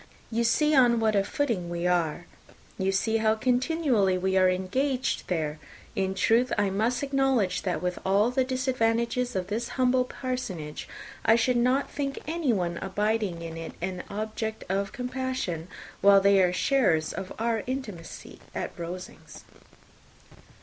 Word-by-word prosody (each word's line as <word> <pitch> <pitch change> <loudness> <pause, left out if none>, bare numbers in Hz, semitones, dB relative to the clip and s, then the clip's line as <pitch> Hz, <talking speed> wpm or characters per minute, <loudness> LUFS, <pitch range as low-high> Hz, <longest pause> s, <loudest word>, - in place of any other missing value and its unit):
You 230 +1 +1
see 300 +7 +3
on 245 -4 +5
what 220 -1 +2
a 200 - +3
footing 205 -7 -1
we 175 0 -3
are. 175 -2 +1 0.5
You 190 0 +1
see 220 +4 +1
how 220 0 +2
continually 250 - +2
we 190 +1 0
are 185 -1 +5
engaged 255 +9 -1
there. 155 -4 -2 0.4
In 190 0 -1
truth, 230 +6 +3
I 205 -2 +2
must 230 +6 0
acknowledge, 270 -9 +1
that, 180 -1 -2
with 180 0 -2
all 200 +5 +3
the 260 +1 +2
disadvantages 250 -1 0
of 185 -1 -1
this 220 +5 -3
humble 255 0 +3
parsonage, 215 - -5 0.3
I 225 - +5
should 235 +2 +2
not 255 +3 +2
think 275 -1 -3
anyone 235 - 0
abiding 205 -3 -1
in 165 0 -6
it 165 0 -6
an 180 +1 -3
object 220 +1 -4
of 195 +1 -1
compassion, 250 -10 -3 0.3
while 200 0 +7
they 195 0 +5
are 180 -1 +3
sharers 185 - +2
of 190 - -6
our 225 -1 0
intimacy 225 -11 -6 0.2
at - - -3
Rosings." 180 +2 -8
220 Hz, 150 wpm, -27 LUFS, 185-250 Hz, 0.5 s, while